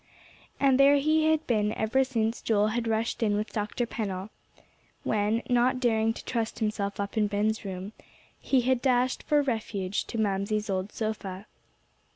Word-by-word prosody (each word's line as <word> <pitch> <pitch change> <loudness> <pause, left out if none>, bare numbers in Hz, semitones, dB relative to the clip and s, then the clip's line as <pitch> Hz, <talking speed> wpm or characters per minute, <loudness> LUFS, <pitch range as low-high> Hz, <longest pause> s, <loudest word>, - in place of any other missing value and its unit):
And 270 -1 +4
there 280 +1 +7
he 310 +2 +3
had 315 0 +1
been 215 -3 +1
ever 235 +5 +1
since 230 -3 -1
Joel 210 -1 +2
had 230 +1 -2
rushed 225 +2 -1
in 210 -2 +2
with 210 0 -3
Dr. 215 +3 -2
Pennell; 200 -3 -4 0.7
when, 215 +2 0
not 250 +1 +2
daring 225 -3 +2
to - - -10
trust 230 -2 -2
himself 205 -2 -2
up 200 +2 -3
in 210 -1 +3
Ben's 210 +2 0
room, 190 +1 -6 0.5
he 265 -2 +2
had 255 0 +1
dashed 255 -1 +2
for 295 -1 +2
refuge 210 -6 -2
to - - -6
Mamsie's 210 0 0
old 190 +2 -2
sofa. 205 -3 -4
220 Hz, 165 wpm, -28 LUFS, 205-245 Hz, 0.7 s, there